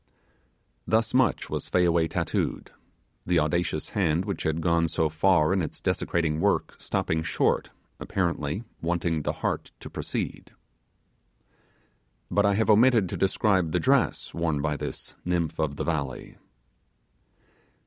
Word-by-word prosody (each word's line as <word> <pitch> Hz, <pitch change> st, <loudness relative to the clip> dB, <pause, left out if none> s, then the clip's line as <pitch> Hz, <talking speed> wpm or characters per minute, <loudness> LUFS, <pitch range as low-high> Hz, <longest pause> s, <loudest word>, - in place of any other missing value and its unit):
Thus 110 Hz, 0 st, +2 dB
much 130 Hz, 0 st, +2 dB
was -, -, -4 dB
Fayaway 85 Hz, -2 st, +3 dB
tattooed. -, -, -2 dB, 0.5 s
The 90 Hz, 0 st, +1 dB
audacious 80 Hz, 0 st, -1 dB
hand 90 Hz, -4 st, +1 dB
which 100 Hz, -, -3 dB
had 80 Hz, +1 st, 0 dB
gone 85 Hz, 0 st, +2 dB
so 80 Hz, 0 st, 0 dB
far 80 Hz, +1 st, +3 dB
in 95 Hz, -, +1 dB
its 80 Hz, -, -5 dB
desecrating 80 Hz, -2 st, 0 dB
work 100 Hz, +4 st, +1 dB
stopping 80 Hz, 0 st, -1 dB
short, 80 Hz, -, 0 dB, 0.3 s
apparently 85 Hz, 0 st, -2 dB, 0.2 s
wanting 85 Hz, -1 st, 0 dB
the -, -, -1 dB
heart -, -, -1 dB
to -, -, -10 dB
proceed. -, -, -4 dB, 1.8 s
But 100 Hz, 0 st, +3 dB
I 100 Hz, -, +2 dB
have 110 Hz, +1 st, +3 dB
omitted 115 Hz, -3 st, +5 dB
to -, -, -3 dB
describe 95 Hz, -4 st, +1 dB
the -, -, +2 dB
dress 135 Hz, -2 st, +1 dB
worn 80 Hz, -3 st, 0 dB
by 75 Hz, 0 st, -1 dB
this -, -, -6 dB
nymph 85 Hz, -3 st, -1 dB
of 75 Hz, -2 st, 0 dB
the -, -, -3 dB
valley. 70 Hz, -6 st, -3 dB
85 Hz, 135 wpm, -26 LUFS, 80-95 Hz, 1.8 s, omitted